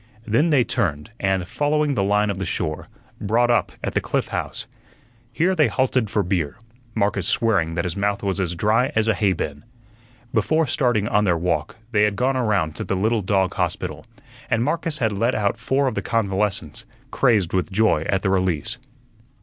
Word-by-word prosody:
Then 115 +10 +2
they 140 -5 +4
turned, 85 - -2
and, 95 -2 0
following 150 +3 +1
the 105 - 0
line 105 +1 +2
of 95 - -5
the - - -2
shore, 75 -3 -3 0.3
brought 120 +4 +2
up 120 - +2
at - - -2
the - - +1
Cliff - - -1
House. - - -4 0.7
Here 165 +10 +1
they 155 -5 +3
halted 130 -4 0
for 105 - +1
beer, 90 -4 -1 0.4
Marcus 100 -4 +1
swearing 95 -8 +1
that 85 - -1
his 90 - -3
mouth 100 0 -1
was 100 0 -1
as 90 -2 -1
dry 115 - +2
as 110 0 +2
a 110 - +4
hay 100 -2 +2
bin. 75 -4 -5 0.7
Before 155 +8 +2
starting 120 -6 +1
on 105 -2 +2
their 85 -3 +2
walk 80 -3 -1 0.2
they 105 -3 +2
had 105 -1 +2
gone 130 +6 +1
around 100 -11 0
to - - -3
the 95 - -2
little 110 +4 +1
dog 95 -1 +1
hospital, - - -3 0.4
and 115 +1 +2
Marcus 165 +2 -1
had 110 -5 +1
let 115 +5 0
out 105 +2 0
four 135 +3 +1
of 130 - 0
the - - -2
convalescents, 105 -3 -1 0.3
crazed 110 -10 +2
with 95 +3 0
joy 105 -5 +3
at 95 -1 +1
the 95 - +1
release. 90 -5 0
105 Hz, 190 wpm, -22 LUFS, 95-120 Hz, 0.7 s, they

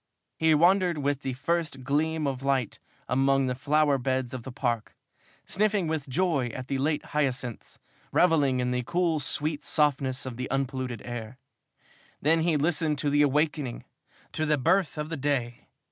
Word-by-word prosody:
He 160 -1 +3
wandered 175 +1 +4
with 145 -1 -1
the 130 - -3
first 145 0 -2
gleam 155 +3 0
of 135 -2 -2
light 135 -4 0 0.3
among 135 +1 +2
the 125 - 0
flower 145 +2 +2
beds 130 -1 -1
of 130 - -5
the 130 - -8
Park, 120 -3 -2 0.5
sniffing 205 -2 +1
with 155 -3 -3
joy 155 -3 +1
at 130 -1 -7
the 135 -1 -1
late 150 +2 0
hyacinths, 130 -5 -2 0.3
revelling 145 -7 +3
in 125 0 0
the 125 0 0
cool, 170 +4 0
sweet 150 +2 -1
softness 135 -4 +1
of 125 -3 -6
the 130 - -4
unpolluted 130 -3 -2
air. 120 0 -6 0.8
Then 160 +3 +3
he 165 -2 +2
listened 155 0 +1
to 145 +1 -1
the 145 +1 +4
awakening, 150 -2 0 0.5
to 155 - -1
the 150 0 +3
birth 165 +4 +1
of 150 0 -3
the 165 - -4
day. 130 -4 -2
140 Hz, 165 wpm, -27 LUFS, 130-155 Hz, 0.8 s, wandered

